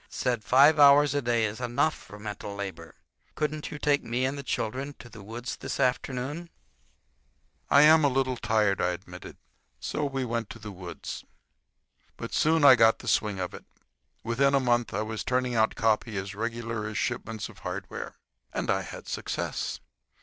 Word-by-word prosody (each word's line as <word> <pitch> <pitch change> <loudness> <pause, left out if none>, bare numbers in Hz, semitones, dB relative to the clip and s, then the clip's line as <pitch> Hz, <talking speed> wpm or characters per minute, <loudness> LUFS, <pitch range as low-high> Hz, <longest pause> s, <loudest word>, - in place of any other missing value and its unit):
—said 120 -4 -1
five 140 +7 +6
hours 145 0 +7
a 145 - +1
day 120 -2 +1
is 110 +3 -4
enough 125 +6 +1
for 100 - -12
mental 105 -1 -6
labor. 95 -5 -7 0.4
Couldn't 150 0 -2
you 150 - -6
take 145 -1 +1
me 120 +3 -1
and 135 +2 -1
the 140 - -5
children 135 +2 -3
to - - -12
the 110 - -12
woods 115 +5 -6
this - - -5
afternoon?" 135 +6 -1 1.2
"I 140 - +7
am 155 +1 +7
a - - +6
little 130 -1 0
tired," 105 -5 +1
I 90 0 +1
admitted. 90 0 -10 0.4
So 150 - -3
we 135 -2 -2
went 115 -2 -3
to - - -8
the 105 -2 -8
woods. 90 -2 -7 0.9
But - - -6
I - - -11
soon 160 0 +3
got 115 -1 +5
the - - -11
swing 105 -3 +1
of 90 -1 -3
it. - - -10 0.6
Within 140 +5 +2
a - - +4
month 120 -5 +1
I 105 - -1
was 110 0 -4
turning 125 -1 0
out 110 -1 +2
copy 110 -1 +1
as 95 +1 -4
regular 115 0 -3
as 105 0 -5
shipments 115 -3 -3
of - - -15
hardware. - - -6 0.4
And - - -1
I - - +1
had - - -9
success. - - -3
120 Hz, 180 wpm, -28 LUFS, 105-135 Hz, 1.2 s, hours